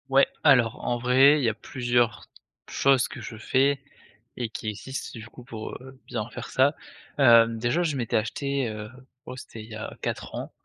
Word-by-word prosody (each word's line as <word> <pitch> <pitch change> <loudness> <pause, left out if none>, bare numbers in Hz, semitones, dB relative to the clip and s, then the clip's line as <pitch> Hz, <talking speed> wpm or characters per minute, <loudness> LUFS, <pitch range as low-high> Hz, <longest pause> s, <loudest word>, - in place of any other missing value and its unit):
Ouais, 135 +1 +5 0.2
alors, 125 -6 +4
en 120 - 0
vrai, 130 +5 +5
il - - -2
y 115 - +3
a - - -2
plusieurs 120 -2 -1 0.4
choses 135 -3 +3
que 130 - -9
je 110 0 -8
fais 135 +4 +1 0.6
et 120 -2 -2
qui 110 0 -5
existent 130 +6 -6
du 110 - -10
coup, 125 - -14
pour, 110 -3 -7
heu, 130 0 -11
bien 115 -2 -4
faire - - -8
ça. 140 +3 +3 0.4
Heu, 115 -4 +7
déjà, 120 +9 0
je 155 -4 -1
m'étais 120 -4 0
acheté, 140 +4 -1
heu, 110 0 -7 0.4
oh - - -7
c'était 115 -3 -9
il 110 - -14
y 110 - -8
a 110 - -7
4 - - -4
ans, - - -6
120 Hz, 195 wpm, -26 LUFS, 115-135 Hz, 0.6 s, Heu